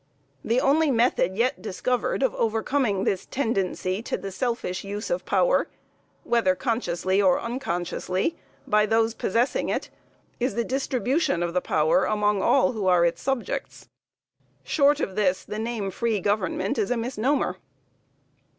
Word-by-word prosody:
The 235 Hz, +3 st, +2 dB
only 295 Hz, +4 st, +3 dB
method 230 Hz, -7 st, +2 dB
yet 255 Hz, +4 st, +1 dB
discovered 250 Hz, +6 st, -1 dB
of 265 Hz, -, +2 dB
overcoming 225 Hz, -2 st, 0 dB
this 195 Hz, -2 st, -1 dB
tendency 195 Hz, -6 st, -1 dB
to -, -, -3 dB
the 195 Hz, -, -6 dB
selfish 230 Hz, -3 st, -2 dB
use 205 Hz, +2 st, -5 dB
of -, -, -1 dB
power, -, -, +2 dB, 0.6 s
whether 225 Hz, -6 st, +2 dB
consciously 190 Hz, -4 st, 0 dB
or 185 Hz, -2 st, +4 dB
unconsciously, 185 Hz, -, -2 dB, 0.3 s
by 210 Hz, 0 st, +3 dB
those 225 Hz, +1 st, +2 dB
possessing 235 Hz, +4 st, 0 dB
it, -, -, -2 dB, 0.5 s
is 250 Hz, +2 st, -1 dB
the 235 Hz, -, +1 dB
distribution 265 Hz, -, 0 dB
of 170 Hz, -1 st, -2 dB
the 180 Hz, -, +1 dB
power 155 Hz, -1 st, +2 dB
among 210 Hz, -1 st, +1 dB
all 275 Hz, 0 st, +3 dB
who 215 Hz, -5 st, -3 dB
are 180 Hz, -2 st, +5 dB
its 170 Hz, -, -1 dB
subjects. 270 Hz, -3 st, -3 dB, 0.7 s
Short 290 Hz, 0 st, +3 dB
of 190 Hz, -11 st, -3 dB
this 185 Hz, -3 st, +1 dB
the 210 Hz, -, -5 dB
name 220 Hz, -4 st, -3 dB
free 225 Hz, +2 st, -1 dB
government 200 Hz, +1 st, -1 dB
is 205 Hz, -, 0 dB
a 245 Hz, -, +1 dB
misnomer. 250 Hz, +4 st, 0 dB
225 Hz, 145 wpm, -25 LUFS, 190-255 Hz, 0.7 s, are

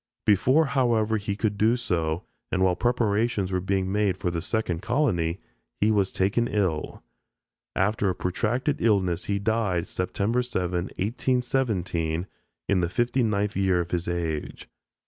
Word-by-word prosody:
Before, 130 Hz, -, +4 dB
however, 120 Hz, -6 st, +2 dB
he 100 Hz, -1 st, -3 dB
could 105 Hz, -1 st, -1 dB
do 115 Hz, +3 st, +4 dB
so, 85 Hz, -7 st, -1 dB, 0.3 s
and 95 Hz, -, +1 dB
while 90 Hz, -1 st, +3 dB
preparations 110 Hz, -3 st, +1 dB
were 95 Hz, -, +1 dB
being 95 Hz, 0 st, 0 dB
made 105 Hz, -2 st, +1 dB
for 90 Hz, -, -1 dB
the 85 Hz, -1 st, -2 dB
second 90 Hz, -3 st, -1 dB
colony, 100 Hz, -, 0 dB, 0.4 s
he 105 Hz, +2 st, +3 dB
was 100 Hz, -3 st, +2 dB
taken 100 Hz, +5 st, +1 dB
ill. 95 Hz, -9 st, -1 dB, 0.7 s
After 100 Hz, +1 st, +1 dB
a 90 Hz, -, -1 dB
protracted 120 Hz, -, -1 dB
illness 95 Hz, -6 st, +2 dB
he 100 Hz, -, 0 dB
died 100 Hz, -4 st, 0 dB
September 100 Hz, +6 st, -1 dB
7, 90 Hz, -7 st, -2 dB
1817, 100 Hz, -8 st, -1 dB, 0.4 s
in 100 Hz, -, +2 dB
the 85 Hz, -, 0 dB
fifty 120 Hz, +5 st, +1 dB
ninth 105 Hz, -2 st, 0 dB
year 95 Hz, -2 st, +2 dB
of 85 Hz, 0 st, -3 dB
his 90 Hz, -1 st, -1 dB
age. 85 Hz, -3 st, -3 dB
100 Hz, 145 wpm, -26 LUFS, 90-115 Hz, 0.7 s, Before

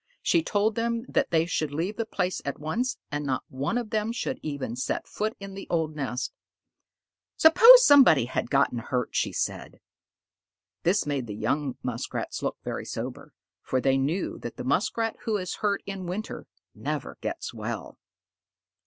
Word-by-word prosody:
She 335 Hz, -, +3 dB
told 215 Hz, -6 st, +1 dB
them 230 Hz, 0 st, -1 dB
that -, -, +1 dB
they 165 Hz, -1 st, +3 dB
should 155 Hz, -3 st, -1 dB
leave 170 Hz, +8 st, -2 dB
the 230 Hz, -1 st, -3 dB
place 180 Hz, -3 st, -1 dB
at 140 Hz, -, -3 dB
once, 230 Hz, -, -1 dB
and 145 Hz, 0 st, -2 dB
not 135 Hz, -2 st, -1 dB
one 140 Hz, -, -2 dB
of 235 Hz, -3 st, -4 dB
them 215 Hz, +1 st, 0 dB
should 260 Hz, +2 st, -3 dB
even 140 Hz, -6 st, -4 dB
set 130 Hz, -, -2 dB
foot 215 Hz, +1 st, -3 dB
in 195 Hz, -1 st, -8 dB
the 195 Hz, -, -8 dB
old 160 Hz, -2 st, 0 dB
nest. 130 Hz, -3 st, -3 dB, 1.0 s
"Suppose 475 Hz, +10 st, +9 dB
somebody 260 Hz, -, +7 dB
had 120 Hz, -, -3 dB
gotten 135 Hz, -3 st, +2 dB
hurt," 125 Hz, +1 st, -2 dB
she -, -, +1 dB
said. -, -, -3 dB, 1.0 s
This 190 Hz, +4 st, +2 dB
made 140 Hz, -4 st, -2 dB
the 105 Hz, -, -5 dB
young 135 Hz, +6 st, -1 dB
Muskrats 125 Hz, -2 st, -4 dB
look -, -, -2 dB
very -, -, -4 dB
sober, -, -, -6 dB, 0.3 s
for 130 Hz, -, 0 dB
they 135 Hz, +1 st, +2 dB
knew 155 Hz, +8 st, -1 dB
that 120 Hz, -, -7 dB
the -, -, -5 dB
Muskrat 210 Hz, -, 0 dB
who 220 Hz, -2 st, +1 dB
is 185 Hz, -2 st, -4 dB
hurt 200 Hz, -2 st, 0 dB
in 195 Hz, -2 st, -5 dB
winter 200 Hz, +5 st, -5 dB, 0.3 s
never -, -, -4 dB
gets -, -, -4 dB
well. -, -, -6 dB
170 Hz, 170 wpm, -27 LUFS, 135-220 Hz, 1.0 s, Suppose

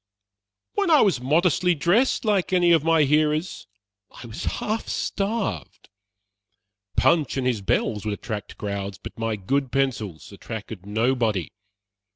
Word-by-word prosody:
"When 400 Hz, -3 st, 0 dB
I 310 Hz, -3 st, +6 dB
was 190 Hz, -, +2 dB
modestly 175 Hz, +5 st, +2 dB
dressed, 200 Hz, -, +2 dB
like 200 Hz, -4 st, +1 dB
any 175 Hz, -2 st, +4 dB
of 165 Hz, -3 st, +4 dB
my 165 Hz, -1 st, +4 dB
hearers, 150 Hz, -, +1 dB, 0.4 s
I -, -, -12 dB
was 110 Hz, -2 st, -7 dB
half 220 Hz, +2 st, -2 dB
starved. 195 Hz, -, -3 dB, 1.1 s
Punch 155 Hz, -5 st, +3 dB
and 130 Hz, -, -1 dB
his 120 Hz, -5 st, 0 dB
bells 105 Hz, +2 st, 0 dB
would 105 Hz, -1 st, -1 dB
attract 105 Hz, -1 st, -6 dB
crowds, 100 Hz, -1 st, -4 dB
but -, -, -10 dB
my 115 Hz, -1 st, -1 dB
good 130 Hz, +7 st, -1 dB
pencils 120 Hz, -13 st, -2 dB
attracted 105 Hz, -1 st, -8 dB
nobody. 110 Hz, -, 0 dB
135 Hz, 135 wpm, -24 LUFS, 105-175 Hz, 1.1 s, I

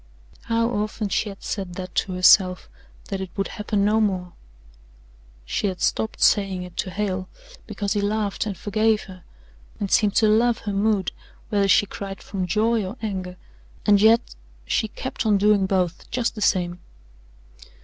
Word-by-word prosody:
How 230 Hz, 0 st, +1 dB
often 210 Hz, -1 st, -2 dB
she 210 Hz, -, 0 dB
had 195 Hz, -, -11 dB
said 190 Hz, -4 st, -4 dB
that 185 Hz, -1 st, -7 dB
to 190 Hz, -, -1 dB
herself 185 Hz, 0 st, +5 dB, 0.4 s
that 195 Hz, -1 st, -3 dB
it 190 Hz, -, -5 dB
would 195 Hz, -, -1 dB
happen 210 Hz, -1 st, -1 dB
no 215 Hz, +2 st, +3 dB
more 185 Hz, -4 st, -1 dB, 1.1 s
she 205 Hz, -, -1 dB
had 185 Hz, -2 st, -4 dB
stopped 220 Hz, -, 0 dB
saying 195 Hz, -3 st, +3 dB
it 180 Hz, -1 st, -11 dB
to -, -, -2 dB
Hale, 185 Hz, -1 st, -3 dB, 0.4 s
because 200 Hz, -1 st, -2 dB
he 205 Hz, -, 0 dB
laughed 205 Hz, 0 st, -1 dB
and 200 Hz, -3 st, -4 dB
forgave 215 Hz, +1 st, +1 dB
her, 185 Hz, -3 st, -13 dB, 0.6 s
and 200 Hz, -2 st, -3 dB
seemed 210 Hz, -2 st, +3 dB
to 220 Hz, -, +4 dB
love 230 Hz, +2 st, +3 dB
her 205 Hz, -, -3 dB
mood, 200 Hz, -2 st, +1 dB, 0.4 s
whether 200 Hz, -2 st, +2 dB
she 200 Hz, -, +5 dB
cried 195 Hz, 0 st, -7 dB
from 190 Hz, -3 st, -3 dB
joy 220 Hz, +3 st, +1 dB
or 190 Hz, +6 st, -6 dB
anger 185 Hz, -4 st, -4 dB, 0.5 s
and 205 Hz, -1 st, +5 dB
yet 225 Hz, +2 st, +4 dB, 0.3 s
she 220 Hz, -, 0 dB
kept 260 Hz, +5 st, -5 dB
on 215 Hz, -3 st, +3 dB
doing 200 Hz, -1 st, +3 dB
both 185 Hz, -3 st, -1 dB
just 245 Hz, -1 st, -1 dB
the 215 Hz, -, -8 dB
same. 180 Hz, -3 st, +1 dB
200 Hz, 170 wpm, -23 LUFS, 185-215 Hz, 1.1 s, herself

